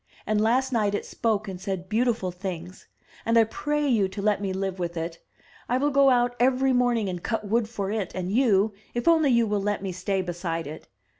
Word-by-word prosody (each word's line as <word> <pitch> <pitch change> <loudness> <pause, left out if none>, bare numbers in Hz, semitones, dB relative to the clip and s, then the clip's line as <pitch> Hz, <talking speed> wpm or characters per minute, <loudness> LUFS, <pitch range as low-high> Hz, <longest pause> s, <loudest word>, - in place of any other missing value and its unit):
And 215 -1 +1
last 255 +4 +2
night 210 -3 +1
it - - -3
spoke 215 -3 -1
and 185 -2 -6
said 190 -2 -4
beautiful 220 -3 0
things. 180 -1 -7 0.4
And 230 +1 +2
I 230 - +7
pray 295 +6 -1
you 220 -7 +3
to 190 +2 -8
let 205 0 +1
me 195 -2 -2
live 190 0 -3
with 175 -1 -3
it. 165 +1 -4 0.5
I 250 - +2
will 290 +2 +1
go 275 0 +5
out 245 -1 +2
every 260 +1 +3
morning 245 -4 +2
and 180 -2 -4
cut 225 0 -2
wood 225 +1 +1
for 200 -4 -3
it 210 -4 -2
and 185 0 -3
you, 215 -3 +3 0.2
if 240 - -2
only 320 -3 +5
you 235 -2 +4
will 205 -2 0
let 205 0 -1
me 190 - -2
stay 185 +2 -1
beside 170 -2 -3
it. 155 +2 -9
210 Hz, 220 wpm, -26 LUFS, 185-240 Hz, 0.5 s, I